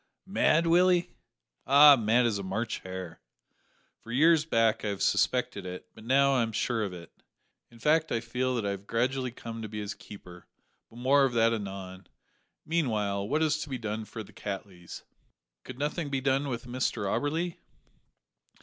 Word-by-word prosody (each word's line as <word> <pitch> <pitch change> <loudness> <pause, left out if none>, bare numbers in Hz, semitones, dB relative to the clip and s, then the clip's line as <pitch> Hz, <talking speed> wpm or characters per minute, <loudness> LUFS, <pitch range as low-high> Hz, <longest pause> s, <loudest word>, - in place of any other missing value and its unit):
"Mad, 170 -4 +2
Willie!" 180 +1 +3 0.6
"Ay, 145 +2 +9
mad 120 +1 +2
as 110 -4 0
a - - -5
March 110 +5 -3
hare. 95 -3 -8 0.8
For 115 - -11
years 155 +4 +4
back 115 -6 +2
I - - -2
have 100 -2 -2
suspected 110 -1 +1
it, 90 0 -7
but 110 - -14
now, 135 +3 +3
I 130 - +2
am 115 -1 -1
sure 115 +1 0
of 100 - -3
it; 85 -2 -10 0.6
in 120 - -17
fact 155 +5 +2
I 115 - +1
feel 125 +2 -2
that 115 -4 -2
I 100 - 0
have 100 0 -7
gradually 130 +3 0
come 115 -1 -8
to 110 - -6
be 105 0 -6
his 105 0 -4
keeper 90 -3 -13 0.4
but 115 - -15
more 135 +3 +4
of 135 -2 +1
that 115 0 +3
anon. 95 -3 -6 0.6
Meanwhile, 105 -11 -1
what 155 +3 +1
is 155 0 +1
to 150 - -6
be 130 - -3
done 110 -1 -4
for 110 0 -7
the - - -17
Cattleys?" 95 -3 -7 0.6
"Could 130 - -9
nothing 150 +2 -2
be 135 -1 -1
done 135 +2 0
with 120 -2 -4
Mr 125 -3 -2
Auberly?" 160 - -1
120 Hz, 180 wpm, -28 LUFS, 105-140 Hz, 0.8 s, Ay